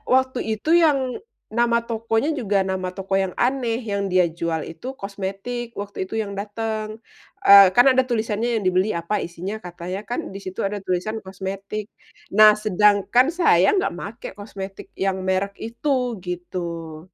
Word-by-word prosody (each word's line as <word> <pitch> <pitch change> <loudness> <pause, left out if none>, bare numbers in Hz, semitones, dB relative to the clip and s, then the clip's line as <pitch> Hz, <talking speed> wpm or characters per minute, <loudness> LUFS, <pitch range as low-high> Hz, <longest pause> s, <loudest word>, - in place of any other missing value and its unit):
waktu 260 -1 +1
itu 220 +8 -3
yang 290 -4 +4 0.6
nama 235 0 +3
tokonya 230 +4 0
juga, 205 -4 -1
nama 185 -1 -2
toko 195 0 -5
yang 185 - -4
aneh 245 -3 0
yang 200 0 -1
dia 180 -1 +4
jual 165 -2 -1
itu 200 - -14 0.2
kosmetik, 200 +5 -4 0.2
waktu 205 0 -9
itu - - -10
yang 200 -2 -5
dateng, 215 +1 -3 0.6
eee, 200 0 +10
kan 245 - +7
ada 260 0 +4
tulisannya 220 0 0
yang 205 - -3
dibeli 185 +3 +2
apa 170 +5 -2
isinya, 175 +4 -6
katanya 180 +2 -5
kan 245 - -1
di 195 - -6
situ 185 0 -7
ada 205 +1 -4
tulisan 185 +5 -1
kosmetik. 195 +2 -5 0.5
Nah, 215 0 +10
sedangkan 210 +5 +4
saya 185 - +5
nggak 380 - +1
make 215 +4 -7
kosmetik 195 -2 -8 0.2
yang 190 -1 +1
merk 195 +1 0
itu, 235 +6 -4 0.4
gitu. 170 -2 -5
200 Hz, 155 wpm, -23 LUFS, 185-225 Hz, 0.6 s, eee